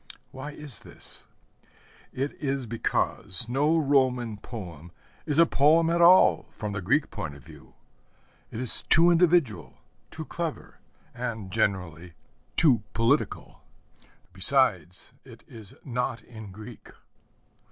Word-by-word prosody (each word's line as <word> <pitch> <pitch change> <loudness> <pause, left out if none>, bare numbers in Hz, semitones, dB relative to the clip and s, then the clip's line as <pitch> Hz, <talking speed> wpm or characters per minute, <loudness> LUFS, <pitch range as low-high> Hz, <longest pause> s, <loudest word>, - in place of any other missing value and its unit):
Why 135 +2 -7
is 150 -4 -5
this? - - -8 0.9
It 135 +3 -3
is 135 -2 -2
because 115 -3 -2
no 145 +6 +2
Roman 130 -7 +1
poem 90 -7 -9 0.4
is 150 - -1
a 170 - +7
poem 160 +3 +3
at 170 0 +1
all 180 +2 +6
from 105 -1 -6
the 100 0 -4
Greek 135 - +1
point 100 -11 -6
of 70 -4 -16
view. - - -16 0.7
It 110 - -7
is 125 -2 +1
too 170 +2 +4
individual, 170 -8 +2 0.3
too 160 - -8
clever, 170 -1 -6 0.3
and, 115 -6 -5
generally, 90 -4 -2 0.4
too 130 -9 +4
political. 115 +6 -1 0.7
Besides, 95 - +2
it - - -15
is 110 -3 -12
not 125 -2 -3
in 110 -4 -11
Greek. 110 +4 -12
125 Hz, 120 wpm, -26 LUFS, 105-150 Hz, 0.9 s, a